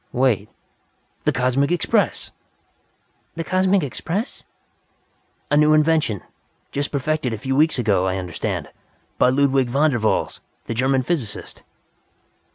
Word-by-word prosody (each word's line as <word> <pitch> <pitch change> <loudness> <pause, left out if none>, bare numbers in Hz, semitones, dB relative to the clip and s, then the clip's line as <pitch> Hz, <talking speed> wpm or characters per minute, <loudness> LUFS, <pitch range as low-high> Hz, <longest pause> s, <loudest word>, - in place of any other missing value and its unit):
Wait! 120 -5 +1 0.8
The - - +4
Cosmic 130 +4 +1
Express." 175 -3 +1 1.0
"The 165 - -3
Cosmic 185 +1 +2
Express?" 175 - -4 1.1
"A 145 - +4
new 150 +1 +5
invention. 155 - +2 0.5
Just 145 0 -2
perfected 140 -2 -1
a - - -3
few 135 +5 -2
weeks 155 +2 +3
ago, 100 -6 +2
I 95 0 -1
understand. 90 -3 -4 0.5
By - - +5
Ludwig 135 -1 +2
Von 145 +5 +3
der 120 - -1
Valls, 110 0 0 0.2
the - - -3
German 130 +2 +1
physicist." 130 -8 -3
135 Hz, 125 wpm, -22 LUFS, 120-155 Hz, 1.1 s, new